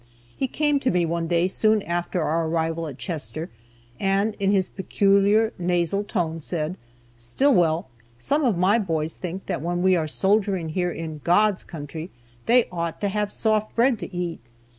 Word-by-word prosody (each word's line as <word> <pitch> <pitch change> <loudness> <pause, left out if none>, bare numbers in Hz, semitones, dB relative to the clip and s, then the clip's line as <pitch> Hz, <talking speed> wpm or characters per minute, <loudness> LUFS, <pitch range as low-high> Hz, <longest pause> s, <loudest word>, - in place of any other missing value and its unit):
He 265 - -1
came 295 +1 +1
to 255 - 0
me 175 -1 +2
one 165 0 -2
day 170 +1 +2
soon 215 +2 +2
after 175 0 -2
our 160 +1 0
arrival 165 0 -1
at 135 -4 -8
Chester, 155 +4 -5 0.5
and 195 +2 +1
in 195 0 +2
his 190 -2 +2
peculiar 200 +3 +2
nasal 175 +2 0
tone 165 -5 -2
said: 160 +1 -3 0.4
"Stillwell, 165 - +2 0.3
some 285 - 0
of 235 -9 +2
my 195 +6 +3
boys 160 -6 -1
think 185 +1 -6
that - - -3
when 175 +2 -1
we 185 0 +5
are 160 -3 0
soldiering 190 0 +1
here 180 +2 0
in 160 -2 -6
'God's 205 +3 +3
Country,' 160 +2 -7 0.4
they 240 0 +5
ought 170 -2 -3
to 205 - +1
have 210 +1 -1
soft 215 -1 0
bread 235 -1 +3
to - - -6
eat. 175 -2 -3
180 Hz, 170 wpm, -24 LUFS, 165-205 Hz, 0.5 s, we